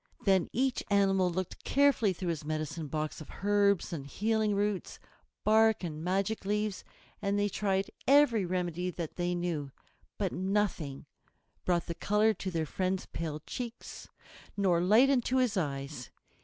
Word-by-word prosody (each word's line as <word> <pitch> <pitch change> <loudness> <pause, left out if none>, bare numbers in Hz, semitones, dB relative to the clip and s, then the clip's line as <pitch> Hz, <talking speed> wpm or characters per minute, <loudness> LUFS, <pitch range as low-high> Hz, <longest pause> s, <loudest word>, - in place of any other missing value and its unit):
Then 190 -3 +3
each 260 +1 0
animal 195 -2 +3
looked 185 +1 -4
carefully 280 -7 +3
through 180 0 -4
his 160 -3 -2
medicine 155 +1 -3
box 155 +1 -3
of 155 - -11
herbs 200 -3 +2
and 140 -4 -5
healing 215 +5 0
roots, 205 -2 -1 0.5
bark 220 -1 +4
and 155 -2 -5
magic 195 +4 0
leaves, 210 -1 -1 0.4
and 200 +1 0
they 205 0 +2
tried 195 -1 -1 0.2
every 275 -6 +5
remedy 180 0 -2
that 170 -3 -5
they 175 0 -1
knew. 165 -5 -2 0.5
But 195 -4 -1
nothing 185 -8 -1 0.6
brought 175 -2 +1
the 170 - -4
color 210 +5 +2
to 195 - -5
their 165 -3 -1
friend's 185 +4 -2
pale 155 -2 -5
cheeks, 240 -2 -7 0.5
nor 180 -4 +3
light 220 +9 +5
into 255 -1 +1
his 250 -4 +2
eyes. 140 -6 -3
190 Hz, 150 wpm, -31 LUFS, 170-210 Hz, 0.6 s, every